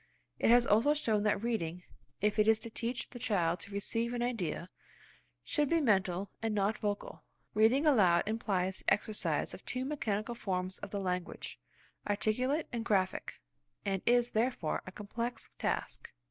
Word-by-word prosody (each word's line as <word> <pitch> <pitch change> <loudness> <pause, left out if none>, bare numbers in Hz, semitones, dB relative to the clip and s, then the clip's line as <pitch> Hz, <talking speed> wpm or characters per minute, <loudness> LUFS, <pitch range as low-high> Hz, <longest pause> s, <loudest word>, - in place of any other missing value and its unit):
It - - +3
has 240 +1 +7
also 235 +9 +4
shown 220 -8 +1
that 210 0 +1
reading, 180 -7 -2 0.4
if 210 +1 +1
it 215 - +4
is 220 0 +5
to 230 - -6
teach 235 +2 -3
the 245 - -8
child 180 -8 +1
to 200 - -9
receive 230 +4 -1
an 240 - -1
idea, 185 -7 -2 0.7
should 295 -2 +1
be 335 - +3
mental 195 - +1
and 225 -1 -1
not 205 +2 +1
vocal. 205 -1 -3 0.3
Reading 225 +8 +4
aloud 190 - +5
implies 195 -4 -1
the - - 0
exercise 210 +1 0
of - - -10
two 255 +1 -2
mechanical 235 -6 -2
forms 185 -4 -3
of - - -7
the 200 - -3
language–articulate 210 - -2
and 235 -1 -2
graphic–and 185 - -2
is, 240 0 +4
therefore, 220 -8 0
a - - -6
complex 230 +5 -5
task. - - -2
215 Hz, 155 wpm, -33 LUFS, 190-240 Hz, 0.7 s, has